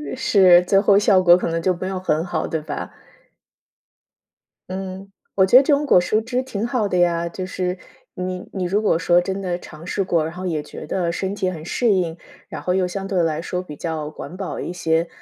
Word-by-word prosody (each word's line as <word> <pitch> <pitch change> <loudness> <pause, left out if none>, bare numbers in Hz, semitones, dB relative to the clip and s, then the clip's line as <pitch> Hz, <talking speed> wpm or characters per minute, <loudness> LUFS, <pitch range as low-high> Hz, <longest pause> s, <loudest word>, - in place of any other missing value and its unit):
是， 190 -8 +5
最 195 +2 +3
后 200 0 +4
效 200 -2 +4
果 175 -1 +7
可 - - -2
能 165 0 -1
就 185 +2 +2
没 185 +2 -5
有 190 -1 -3
很 160 -3 0
好， 175 -3 -2
对 160 - -2
吧？ 150 - -6 1.8
嗯， 190 +1 -6 0.3
我 190 - +5
觉 190 - +2
得 260 - +9
这 290 - +3
种 285 +1 +1
果 180 - +5
蔬 215 +5 +1
汁 250 +3 -2
挺 230 -4 -3
好 240 -5 0
的 180 - 0
呀， 170 -1 +2
就 185 +2 -5
是 185 0 -3 0.4
你 180 0 -5
你 190 -2 -3
如 200 +4 +1
果 200 -6 +2
说 175 +1 +3
真 190 +2 -4
的 180 -2 -2
尝 165 -1 -12
试 195 - -1
过， 170 -4 +1
然 160 - -5
后 180 +1 -7
也 160 -4 -1
觉 150 - -10
得 175 +2 -1
身 190 +3 -2
体 190 -2 -1
很 165 -4 -7
适 220 +6 +1
应， 175 -3 -1 0.3
然 - - -6
后 180 - -1
又 185 0 +1
相 195 +2 -4
对 185 -3 +1
来 160 -1 -1
说 180 +1 -4
比 150 -5 -10
较 155 -2 -4
环 170 - -9
保 190 -1 -5
一 - - -4
些， 165 -1 0
180 Hz, 245 characters per minute, -21 LUFS, 170-195 Hz, 1.8 s, 得